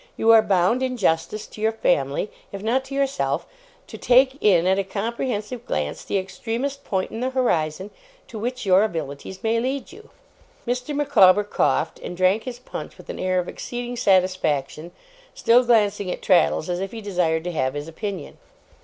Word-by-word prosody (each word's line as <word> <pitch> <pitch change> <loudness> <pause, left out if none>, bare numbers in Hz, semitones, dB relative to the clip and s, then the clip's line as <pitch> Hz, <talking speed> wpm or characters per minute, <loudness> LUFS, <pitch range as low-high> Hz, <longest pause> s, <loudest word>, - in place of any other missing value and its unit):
You 225 - +4
are 225 -1 +8
bound, 195 +5 +2
in 255 -1 -1
justice 180 +1 0
to 210 - -12
your 220 0 +2
family, 145 -4 0 0.2
if 200 0 -7
not 245 +4 +1
to 275 +1 -7
yourself, 275 0 0 0.4
to - - -10
take 260 +2 +4
in 180 -5 +4
at 190 +1 +3
a - - +1
comprehensive 225 +3 -3
glance 75 -1 -2
the - - -1
extremest 235 +8 -4
point 190 -2 -2
in 225 - -5
the 255 +2 -1
horizon 190 -8 -1 0.4
to 220 - -8
which 245 +1 -4
your 190 0 +5
abilities 165 -1 -5
may 225 +1 +2
lead 265 +6 -3
you.' 435 +4 -14 0.6
Mr. 250 +4 -2
Micawber 205 -9 +5
coughed, 160 -5 0
and 175 - -7
drank 185 +5 +2
his 250 -2 -5
punch 250 - -8
with - - -15
an - - -6
air 185 0 0
of 180 - -3
exceeding 245 0 -5
satisfaction 180 - +1 0.4
still 240 +2 +4
glancing 210 -5 +2
at - - -5
Traddles, 175 -3 +3
as 175 0 -2
if 195 +2 -4
he 230 - -6
desired 175 -5 0
to 180 - -3
have 130 -4 -1
his 145 +1 -5
opinion. 200 +4 -6
205 Hz, 180 wpm, -23 LUFS, 180-245 Hz, 0.6 s, are